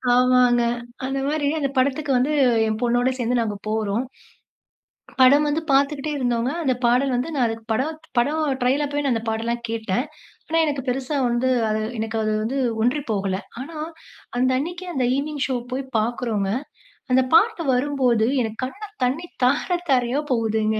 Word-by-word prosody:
ஆமாங்க. 250 -1 +4 0.4
அந்த 270 +1 -2
மாரி 295 -1 0
அந்த 275 -2 0
படத்துக்கு 280 +2 +1
வந்து 275 +5 +1 0.3
என் 215 0 -1
பொண்ணோட 245 +1 +2
சேர்ந்து 245 0 0
நாங்க 215 -3 -1
போறோம். 215 +2 0 1.2
படம் 285 +4 +6
வந்து 315 +2 0
பார்த்துக்குட்டே 280 +2 +2
இருந்தோங்க. 245 -1 0
அந்த 260 -4 +2
பாடல் 250 +3 +3
வந்து 255 +7 -2
நான் 235 -4 +2 0.2
படம் 310 +7 -1 0.2
படம் 295 +6 +1 0.2
ட்ரெயில் 265 +4 +2
அப்பவே 290 +1 -2
அந்த 225 -1 -1
பாடல்லாம் 235 +2 -2
கேட்டேன். 225 +3 -1 0.4
ஆனா 325 +1 +1
எனக்கு 285 -3 -2
பெருசா 265 +3 -1
வந்து 240 +2 +1 0.5
எனக்கு 225 0 -3
அது 215 0 0
வந்து 250 +5 -2 0.3
ஒன்றி 250 +5 +2
போகல. 195 -2 0 0.2
ஆனா, 310 +4 -7 0.6
அந்த 255 +1 +2
அன்னைக்கே 350 +5 -5
அந்த 255 -2 +1
ஈவனிங் 290 0 -2
ஷோ 260 - -2 0.2
போய் 265 +1 -2
பார்க்குறோங்க. 220 -3 -1 0.6
அந்த 260 +1 +5
பாட்டு 430 -1 +4
வரும்போது 250 -4 +2
எனக்கு 225 +1 -4
கண்ல 400 +11 -9 0.2
தண்ணீ 285 +8 -1 0.2
தார 300 +7 +2
தாரையா 255 +3 +2
போகுதுங்க. 220 -2 +1
255 Hz, 150 wpm, -23 LUFS, 230-285 Hz, 1.2 s, படம்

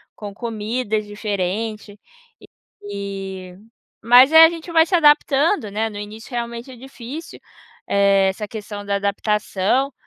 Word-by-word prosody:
com 205 -2 -8
comidas 220 0 -3
diferente". 205 +1 -4 0.9
E 195 -2 -7 0.5
mas 245 +4 +7
é, 320 0 +10
a 325 - +4
gente 335 0 -8
vai 325 -1 +5
se 360 - 0
adaptando, 295 - +3
né, 220 +2 -1
no 210 - -9
início 215 +4 -10
realmente 235 +1 -5
é - - -11
difícil, 265 +5 -10 0.5
eh, 200 -1 +3
essa 210 +2 -5
questão 205 -1 -8
da 200 0 -1
adaptação, 210 +5 -1
215 Hz, 130 wpm, -20 LUFS, 200-260 Hz, 0.9 s, é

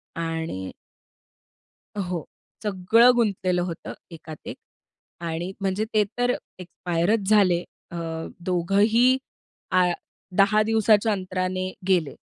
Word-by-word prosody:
आणि 165 - -3 1.3
हो, 180 -5 -2 0.4
सगळं 210 +4 +5
गुंतलेलं 190 -6 +1
होतं 175 -2 -5 0.2
एकात 160 -2 -10
एक. - - -5 0.6
आणि 170 +2 -3
म्हणजे 195 +2 0
ते 215 -1 +4
तर 245 0 +2 0.3
एक्सपायरचं 180 +3 -1
झाले 185 -5 +4 0.3
अ, - - -7 0.4
दोघंही 200 +8 +3 0.5
आ 185 0 +5 0.5
10 205 +2 +5
दिवसाच्या 220 0 +3
अंतराने 185 -1 -2 0.2
गेले. 170 -7 +2
185 Hz, 100 wpm, -25 LUFS, 175-210 Hz, 1.3 s, सगळं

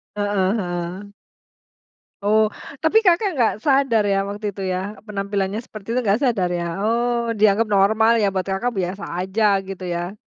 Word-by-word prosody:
Heeh 205 -1 +1
heeh. 180 +1 -4 1.1
Oh. 215 +1 +4 0.3
Tapi 320 +8 +4
Kakak 370 +3 +4
nggak 235 -4 +3
sadar 270 -6 +3
ya, 195 - +2
waktu 205 +1 -5
itu 200 -1 -6
ya? 185 - -1 0.3
Penampilannya 200 0 -2
seperti 215 -2 -11
itu 255 - +1
nggak 205 +1 +2
sadar 205 -8 +1
ya? 170 - -2 0.2
Oh, 235 +3 +1 0.2
dianggap 215 +2 +4
normal 220 +3 +4
ya, 205 - +3
buat 185 -1 -2
Kakak 195 +6 -1
biasa 185 +2 -4 0.2
aja, 190 +4 -1 0.2
gitu 190 -1 -7
ya? 175 +4 -4
205 Hz, 155 wpm, -21 LUFS, 190-225 Hz, 1.1 s, Oh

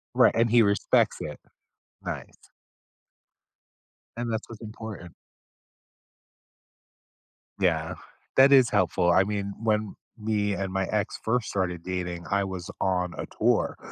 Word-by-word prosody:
Right, - - +5
and 115 0 +3
he 120 0 +6
respects 100 -1 +2
it. - - -6 0.6
Nice. - - -7 1.7
And 120 -1 -2
that's 110 0 -3
what's 115 -2 -10
important. 110 -5 -8 2.5
Yeah, - - +1 0.4
that 135 +1 +7
is 130 -3 +7
helpful, 90 -2 +2
I 95 - +5
mean, 100 -1 -3
when 110 -2 0 0.2
me 105 -2 0
and 95 0 -3
my 95 0 0
ex 105 -1 -2
first 120 +1 0
started 90 -3 -2
dating, 90 -2 -4
I 100 0 +2
was 95 -2 -6
on 90 -2 0
a - - -4
tour, - - +2
100 Hz, 125 wpm, -26 LUFS, 95-110 Hz, 2.5 s, that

